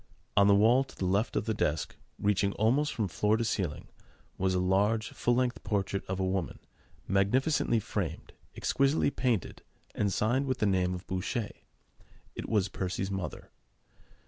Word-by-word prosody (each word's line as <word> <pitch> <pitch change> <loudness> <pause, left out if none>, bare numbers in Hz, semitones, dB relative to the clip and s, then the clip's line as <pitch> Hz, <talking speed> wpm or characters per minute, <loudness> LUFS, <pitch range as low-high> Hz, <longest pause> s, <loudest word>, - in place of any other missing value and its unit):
On 100 0 +6
the 100 - +6
wall 115 +6 +5
to 135 - -16
the 95 - -3
left 100 +5 +1
of 100 - 0
the 110 - 0
desk, 75 -6 -1 0.2
reaching 100 -1 +1
almost 135 +8 +2
from 110 -5 -1
floor 105 +5 +1
to 115 - -1
ceiling, 90 -9 -2 0.5
was 95 0 0
a - - +2
large 105 +4 +2
full 120 - 0
length 125 0 0
portrait 100 -1 -1
of 95 0 -3
a 95 - +1
woman, 95 -2 -2 0.5
magnificently 115 +5 +2
framed, 95 -6 -4 0.2
exquisitely 140 +1 +2
painted, 120 - -1 0.3
and 100 -2 0
signed 120 +8 +1
with 130 -1 0
the 110 - +1
name 90 -2 +1
of 90 - -8
Boucher. 100 +4 -2 0.8
It - - -6
was 105 -3 +2
Percy's 95 +1 -3
mother. 95 -2 -5
100 Hz, 165 wpm, -30 LUFS, 95-115 Hz, 0.8 s, On